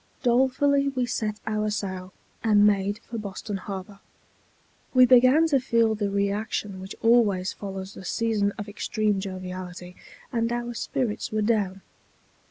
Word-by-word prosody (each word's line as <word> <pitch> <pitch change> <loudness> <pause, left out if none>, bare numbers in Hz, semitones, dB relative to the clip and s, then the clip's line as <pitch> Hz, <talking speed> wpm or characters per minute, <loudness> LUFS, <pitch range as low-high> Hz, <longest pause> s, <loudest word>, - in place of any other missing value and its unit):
Dolefully 265 +3 +3
we 260 -3 0
set 215 -3 -2
our 215 -1 -1
sail, 185 -3 -4 0.3
and 210 -2 +5
made 200 0 +2
for 230 -1 -5
Boston 200 0 -5
Harbor. 195 +1 -7 1.0
We 255 0 +8
began 255 +5 +6
to 275 -3 +4
feel 230 -3 +2
the 205 -1 -1
reaction 200 0 -2
which 190 +1 -8
always 210 -6 +3
follows 195 -1 -7
a - - -9
season 210 0 0
of 205 - -5
extreme 210 0 -1
joviality, 185 -2 -7 0.4
and 230 0 0
our 240 0 -2
spirits 230 0 -2
were 215 0 0
down. 200 -4 0
210 Hz, 140 wpm, -26 LUFS, 195-235 Hz, 1.0 s, We